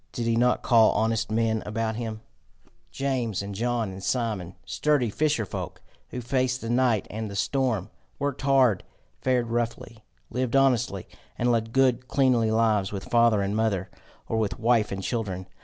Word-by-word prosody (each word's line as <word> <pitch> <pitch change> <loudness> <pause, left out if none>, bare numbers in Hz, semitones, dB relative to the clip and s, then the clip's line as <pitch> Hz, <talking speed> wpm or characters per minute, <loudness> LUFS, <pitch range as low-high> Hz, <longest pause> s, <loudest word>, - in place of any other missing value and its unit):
Did 120 -3 -3
he 115 0 +2
not 125 +2 +2
call 115 -3 +5
honest 115 0 0
men 110 0 +1
about 110 +1 -2
him 110 -2 -5 0.7
James 125 -7 -2
and 100 0 -6
John 115 0 -1
and 95 +1 -9
Simon 105 -8 -2
sturdy 145 -7 +1
fisher 150 -4 +1
folk, - - -6 0.3
who 125 - -5
faced 130 +1 0
the 115 - -3
night 120 -4 +2
and 110 0 -4
the 100 - -7
storm, 110 +1 0 0.3
worked 140 -1 -2
hard, 135 -7 +3 0.4
fared 125 -3 +1
roughly, 115 -1 -3 0.3
lived 125 0 -1
honestly, 125 -8 +2 0.3
and 120 0 +2
led 115 -1 0
good 130 -1 +2
cleanly 125 -5 +2
lives 110 -3 +2
with 100 -2 -7
father 115 -3 +4
and 100 +1 -2
mother, 100 -4 0 0.4
or 110 - -1
with 110 -3 -1
wife 115 -2 +2
and 95 0 -4
children? 95 -6 -3
115 Hz, 165 wpm, -26 LUFS, 110-125 Hz, 0.7 s, call